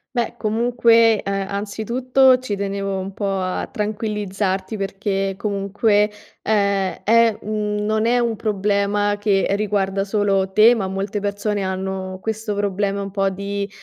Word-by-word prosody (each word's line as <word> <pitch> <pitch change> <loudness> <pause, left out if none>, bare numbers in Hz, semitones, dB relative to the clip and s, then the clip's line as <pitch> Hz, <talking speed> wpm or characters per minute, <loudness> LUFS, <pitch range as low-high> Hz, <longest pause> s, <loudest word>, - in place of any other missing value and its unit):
Beh 240 -1 -1
comunque, 230 0 +3
ehm, 195 -1 -2
anzitutto 240 +6 +2
ci 210 -6 -4
tenevo 195 -1 -2
un 195 +1 -6
po' 195 -2 -2
a 185 0 -2
tranquillizzarti 205 -2 -2
perché 195 -1 -2
comunque, 205 +1 +1 0.3
ehm, 200 -3 +1
è 230 0 +4
mhmm, 210 -1 -2
non 215 +1 +1
è 245 +1 +3
un 235 -2 0
problema 205 0 0
che 205 -2 +1
riguarda 200 -1 0
solo 195 -2 0
te 220 +5 +6
ma 200 -5 -2
molte 195 +2 -3
persone 205 0 -2
hanno 190 0 -4
questo 220 0 -3
problema 200 0 -1
un 200 0 -5
po' 195 0 +1
di 200 +1 -4
205 Hz, 140 wpm, -21 LUFS, 195-215 Hz, 0.3 s, te